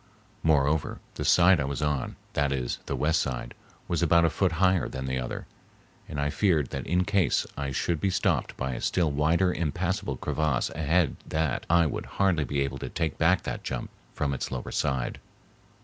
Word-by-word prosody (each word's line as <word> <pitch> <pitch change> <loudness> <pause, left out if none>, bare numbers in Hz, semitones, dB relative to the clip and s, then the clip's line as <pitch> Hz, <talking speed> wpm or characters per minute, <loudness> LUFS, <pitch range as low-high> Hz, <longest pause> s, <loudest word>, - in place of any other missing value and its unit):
Moreover, 75 -1 +2
the - - -4
side 90 0 +5
I 70 - 0
was 70 +2 -3
on—that 70 0 -2
is, 65 -3 -2
the - - -1
west 80 +2 +2
side—was - - -5
about 85 -1 +5
a 80 - +2
foot 95 -3 +1
higher 95 +1 +2
than 65 0 -5
the 65 0 -1
other, - - -5 0.6
and 75 - -4
I 70 0 0
feared 80 -9 +1
that 70 - -4
in 90 +2 +2
case 100 -2 +2
I 70 -1 -3
should 75 +4 -1
be 100 - +2
stopped 90 - 0
by 65 0 -2
a - - -5
still 85 -4 +1
wider 85 +6 +2
impassable 90 - -2
crevasse 75 -4 0
ahead 80 +1 +1
that 80 -4 -1
I 85 0 +5
would 75 - -3
hardly 90 -6 +3
be 70 0 -1
able 70 -1 -2
to - - -5
take 80 -3 -2
back 85 +3 +3
that - - -4
jump - - -4 0.2
from 70 -2 -1
its 65 - -3
lower 65 -1 -5
side. 65 -3 -1
75 Hz, 185 wpm, -27 LUFS, 70-85 Hz, 0.6 s, side